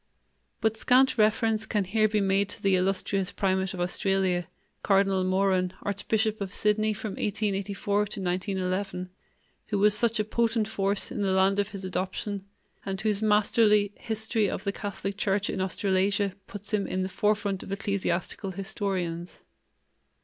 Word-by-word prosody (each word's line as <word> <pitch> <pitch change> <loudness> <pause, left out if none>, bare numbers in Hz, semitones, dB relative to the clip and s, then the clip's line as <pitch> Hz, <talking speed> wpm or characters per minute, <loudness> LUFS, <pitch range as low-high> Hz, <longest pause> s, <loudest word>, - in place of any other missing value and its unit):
But 220 0 +2
scant 260 +3 +4
reference 220 0 +2
can 210 -2 +1
here 215 +3 +2
be 210 -1 +1
made 195 +1 +2
to - - -8
the 195 -1 +4
illustrious 190 +1 0
primate 190 -1 0
of - - -7
Australia, 180 -1 0 0.3
Cardinal 195 -1 +3
Moran, 185 -1 +1
archbishop 215 +2 -1
of 195 0 -4
Sydney 215 +1 +2
from 210 0 -4
1884 200 -1 -2
to 205 - +4 0.2
1911, 185 0 -2 0.6
who 210 - -1
was 210 +1 +5
such 230 0 +1
a - - +3
potent 225 0 0
force 200 -1 -1
in - - -3
the 195 -1 +1
land 190 +1 +3
of 205 0 0
his 195 -2 -7
adoption, 190 +2 -3 0.4
and 190 -1 -4
whose 215 -1 +1
masterly 210 -1 +4
History 220 -2 0
of - - -4
the 200 - 0
Catholic 200 -1 -5
Church 200 0 0
in 190 - -2
Australasia 195 +1 +1
puts 205 0 -8
him 205 -2 +1
in 185 - -1
the - - -1
forefront 205 0 0
of - - -9
ecclesiastical 195 -1 -2
historians. 190 -4 -4
200 Hz, 155 wpm, -27 LUFS, 190-210 Hz, 0.6 s, was